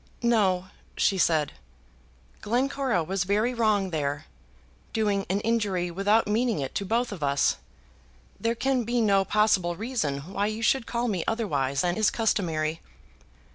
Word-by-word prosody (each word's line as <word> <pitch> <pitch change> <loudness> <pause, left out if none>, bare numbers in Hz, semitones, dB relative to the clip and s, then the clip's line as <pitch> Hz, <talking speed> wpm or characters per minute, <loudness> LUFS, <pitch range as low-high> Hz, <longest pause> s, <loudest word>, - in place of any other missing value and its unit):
"No," 190 -6 +2 0.3
said 165 -6 +2
she, - - -23 0.9
"Glencora 255 -3 0
was 185 +3 -1
very 210 +6 +1
wrong 215 -5 +1
there, 145 -1 -2 0.7
doing 205 -3 0
an 195 +2 +1
injury 205 -6 0
without 205 +5 +2
meaning 225 +1 +1
it 135 -2 -4
to 200 - -2
both 235 +4 0
of 190 -6 -7
us. 140 -1 +2 0.8
There 230 +1 0
can 265 0 0
be 240 +2 0
no 200 -3 +3
possible 195 -4 +2
reason 185 - -2
why 205 +1 0
you 215 +1 -4
should 260 0 +2
call 240 +1 -1
me 190 -7 -1
otherwise 145 - 0
than 175 -1 0
is 215 -1 +3
customary." 165 -8 -1
205 Hz, 145 wpm, -26 LUFS, 175-230 Hz, 0.9 s, no